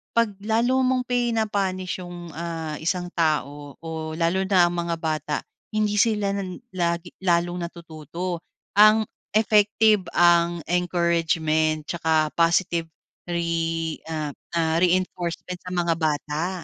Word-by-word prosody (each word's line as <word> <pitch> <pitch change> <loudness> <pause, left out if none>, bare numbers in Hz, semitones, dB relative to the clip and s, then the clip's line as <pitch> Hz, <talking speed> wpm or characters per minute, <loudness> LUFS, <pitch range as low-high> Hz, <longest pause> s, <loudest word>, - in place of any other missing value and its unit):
'pag 230 -2 +3
lalo 230 +5 +1
mong 255 -1 +1
pina-punished 210 -7 -1
yung, 175 -2 -8
ah, 165 -2 -5
isang 175 +2 -2
tao 145 -4 -1
o 160 -1 -5
lalo 180 +3 +1
na 190 -2 +5
ang 175 - +3
mga 170 -1 -1
bata, 155 -2 -2 0.4
hindi 210 -1 +1
sila 210 -3 +2
na 200 -1 -3 0.2
lagi 170 -1 -1
lalong 175 -1 +1
natututo. 170 +1 -6 0.4
Ang 215 +1 +7 0.3
effective, 215 -1 +4
ang 170 -1 +4
encouragement, 165 -3 +1
tsaka 160 -1 +1
positive 170 0 +2 0.4
re 165 -2 -1
ah, 160 +1 -2
reinforcement 180 0 -1
sa 180 0 -6
mga 170 -1 +2
bata. 155 +3 -1
170 Hz, 115 wpm, -24 LUFS, 165-190 Hz, 0.4 s, Ang